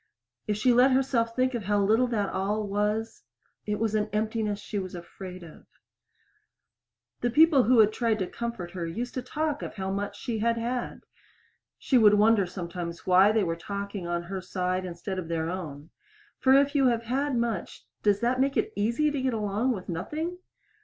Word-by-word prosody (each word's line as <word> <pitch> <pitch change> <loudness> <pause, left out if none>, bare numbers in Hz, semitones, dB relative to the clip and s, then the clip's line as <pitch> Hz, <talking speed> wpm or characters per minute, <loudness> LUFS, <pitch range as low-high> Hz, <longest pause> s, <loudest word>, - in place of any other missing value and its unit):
If 210 -1 0
she 245 +3 +3
let 250 +3 +6
herself 245 -3 +1
think 255 0 +1
of 230 -5 -3
how 205 +1 +2
little 220 +5 +3
that 210 -5 -1
all 205 +3 -1
was 210 +2 -1 0.5
it 210 - 0
was 220 0 -1
an 215 0 0
emptiness 215 -1 -1
she 210 0 -4
was 185 -1 -6
afraid 180 +1 -9
of. 160 -2 -14 1.5
The 245 - 0
people 295 0 +5
who 250 +2 +4
had 215 -1 +5
tried 230 -2 +1
to 190 - -1
comfort 235 -4 -5
her 175 -3 -4
used 235 +9 -4
to 255 - -3
talk 295 +3 -2
of - - -6
how 190 -2 -3
much 200 +1 -4
she 235 -4 -3
had 230 +1 +1
had. 240 +2 -3 0.8
She 255 - +2
would 210 -2 +6
wonder 210 -2 +4
sometimes 170 -1 -6
why 190 +3 +6
they 215 -1 +2
were 165 -2 -1
talking 200 +1 -5
on 175 0 -2
her 190 +2 -5
side 185 0 -2
instead 185 +2 -5
of 175 - -6
their 165 0 -2
own. 155 -4 -7 0.5
For 265 - +4
if 280 +1 +4
you 275 -3 +4
have 235 -2 +1
had 265 +4 -1
much 235 -5 -3 0.2
does 205 0 +2
that 245 +2 +1
make 275 +1 +1
it - - 0
easy 235 +9 +1
to 285 -2 -2
get 260 -2 0
along 215 +4 0
with 195 -6 -5
nothing? 305 - -4
210 Hz, 195 wpm, -27 LUFS, 190-240 Hz, 1.5 s, let